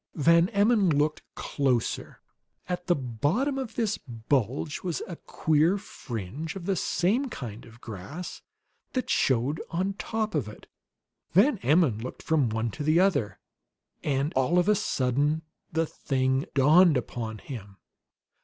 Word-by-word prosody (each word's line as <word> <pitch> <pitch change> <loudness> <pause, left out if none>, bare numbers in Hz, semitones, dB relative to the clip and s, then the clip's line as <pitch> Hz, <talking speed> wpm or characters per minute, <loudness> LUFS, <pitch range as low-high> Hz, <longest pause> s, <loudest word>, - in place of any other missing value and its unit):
Van 170 +3 +4
Emmon 205 -2 +3
looked 150 0 +1
closer. 130 -5 -1 0.5
At 180 0 -4
the 175 - +4
bottom 145 - 0
of 235 -4 -5
this 220 -4 0
bulge 125 +4 -2
was 175 -7 -3
a 175 - -6
queer 160 +4 +1
fringe 130 - -6
of 185 -3 -7
the 195 0 +1
same 215 - +1
kind 120 - -7
of 115 +1 -16
grass 120 - -7 0.5
that 255 - -1
showed 130 +4 +2
on 185 +3 -1
top 220 +2 -3
of 145 -9 0
it. 105 - -11 0.7
Van 210 - +4
Emmon 145 - +3
looked 125 +3 -7
from 150 -7 +2
one 110 +1 -1
to 145 - -5
the 155 +3 +4
other, 180 - +2 0.7
and 140 +1 0
all 130 +7 +2
of 180 - +3
a 210 - +6
sudden 145 - 0 0.3
the 165 0 +1
thing 130 -2 -1
dawned 155 +3 +6
upon 115 -2 -4
him. 105 -5 -9
150 Hz, 145 wpm, -27 LUFS, 125-180 Hz, 0.7 s, a